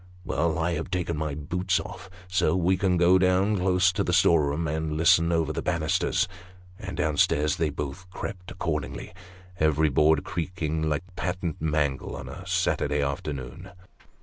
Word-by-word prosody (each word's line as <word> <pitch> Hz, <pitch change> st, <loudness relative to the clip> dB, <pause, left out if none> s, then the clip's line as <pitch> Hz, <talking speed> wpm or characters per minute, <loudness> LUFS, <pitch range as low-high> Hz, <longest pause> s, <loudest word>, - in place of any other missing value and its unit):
" 90 Hz, -, -23 dB
Well; 80 Hz, -1 st, 0 dB
I 85 Hz, +1 st, 0 dB
have 85 Hz, +2 st, -3 dB
taken 90 Hz, -2 st, -1 dB
my 75 Hz, -1 st, -3 dB
boots 90 Hz, +6 st, -1 dB
off, 100 Hz, +1 st, -8 dB, 0.2 s
so 95 Hz, 0 st, +1 dB
we 95 Hz, +1 st, +2 dB
can 95 Hz, -1 st, +1 dB
go 90 Hz, +2 st, +5 dB
down, 95 Hz, +3 st, +3 dB
close 90 Hz, 0 st, +3 dB
to 100 Hz, +2 st, -1 dB
the 90 Hz, -, -1 dB
storeroom 80 Hz, -3 st, +3 dB
door, 75 Hz, -, -1 dB
and 80 Hz, -1 st, -2 dB
listen 85 Hz, 0 st, +4 dB
over 80 Hz, -2 st, +1 dB
the -, -, -3 dB
banisters; 80 Hz, -2 st, 0 dB, 0.3 s
" 90 Hz, +1 st, -23 dB
and 105 Hz, -, -6 dB
down 75 Hz, -1 st, 0 dB
stairs 75 Hz, +4 st, +2 dB
they 80 Hz, -3 st, +1 dB
both 75 Hz, +5 st, -6 dB
crept 90 Hz, 0 st, -7 dB
accordingly, 75 Hz, -5 st, -4 dB, 0.5 s
every 80 Hz, 0 st, +3 dB
board 75 Hz, +2 st, +3 dB
creaking 80 Hz, -3 st, -2 dB
like 75 Hz, +2 st, -1 dB
a -, -, -21 dB
patent 90 Hz, -3 st, -3 dB
mangle 75 Hz, -3 st, -1 dB
on -, -, -7 dB
a -, -, -9 dB
Saturday 70 Hz, 0 st, +1 dB
afternoon. 70 Hz, +4 st, -5 dB
85 Hz, 175 wpm, -26 LUFS, 75-90 Hz, 0.5 s, go